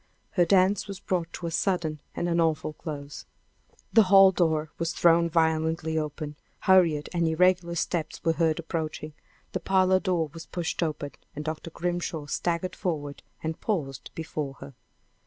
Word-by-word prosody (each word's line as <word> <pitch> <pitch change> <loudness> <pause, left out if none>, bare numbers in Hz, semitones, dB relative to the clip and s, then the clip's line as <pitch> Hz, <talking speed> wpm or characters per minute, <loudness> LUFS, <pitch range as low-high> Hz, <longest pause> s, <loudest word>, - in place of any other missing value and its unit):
Her 175 - +3
dance 190 +3 +3
was 195 -1 -6
brought 170 -3 -2
to 175 - -6
a 165 - -2
sudden 165 -4 0
and 175 - -1
an 170 0 +1
awful 160 -1 0
close. 145 -2 -7 0.7
The 225 - +8
hall 195 -1 +8
door 160 -4 +1
was 165 0 -1
thrown 170 0 +4
violently 160 0 +1
open, 150 -1 -3 0.2
hurried 170 -6 +4
and 170 -1 +1
irregular 175 +1 +2
steps 160 -2 -2
were 165 - +3
heard 160 -1 +1
approaching, 160 -2 -4 0.4
the - - -2
parlor 185 -1 +3
door 175 -6 0
was 165 0 -9
pushed 175 -1 -3
open, 150 -3 -2 0.2
and 150 +1 -5
Dr. 155 +1 -4
Grimshaw 175 -2 -3
staggered 175 +4 -2
forward 145 -5 -3 0.2
and 160 0 -3
paused 135 - -2
before 155 -4 -4
her! 140 - -11
165 Hz, 155 wpm, -27 LUFS, 155-175 Hz, 0.7 s, The